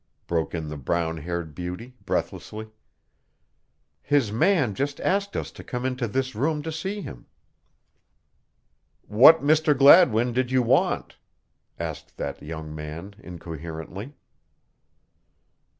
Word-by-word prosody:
broke 85 0 -1
in 80 -2 -4
the 75 0 -6
brown 80 +4 -1
haired 85 0 -5
beauty, 90 - -6
breathlessly. 110 0 -3 1.3
"His 140 -8 +1
man 130 - +2
just 140 +6 -3
asked 200 +1 0
us - - -4
to - - -12
come 125 0 -4
into 125 -2 -1
this 130 +4 -2
room 150 +6 -1
to 160 - -4
see 190 +6 -4
him." - - -10 1.8
"What 135 +9 +7
Mr. 150 -1 +3
Gladwin 130 -5 +6
did 125 0 0
you 130 -1 +2
want?" 115 - +1 0.6
asked 80 -3 -7
that - - -5
young 80 0 -7
man 80 +6 -7
incoherently. 85 - -8
110 Hz, 120 wpm, -25 LUFS, -, 1.8 s, What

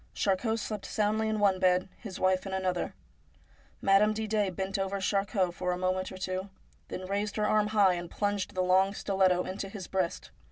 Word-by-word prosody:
Charcot 220 +3 +1
slept 215 -2 -4
soundly 215 +1 +1
in 220 - 0
one 200 -3 +3
bed, 185 0 +3
his 200 -5 -8
wife 185 +1 +2
in 190 - -5
another. 185 -2 0
1 - - -10 0.9
Madame 200 +2 +5
Didet 210 -3 0
bent 195 +1 -2
over 195 +1 -1
Charcot 195 -1 0
for 180 0 -2
a 180 - -1
moment 185 0 -1
or 190 - -8
two, 185 +1 -3 0.4
then 185 - -6
raised 200 +2 -2
her 210 - +1
arm 210 0 +3
high 205 -3 +4
and 175 -1 -5
plunged 205 -1 -2
the 185 - +1
long 190 +2 +3
stiletto 190 -3 +2
into 195 +1 -5
his 195 -2 -7
breast. 170 - -2
195 Hz, 195 wpm, -30 LUFS, 185-205 Hz, 0.9 s, Madame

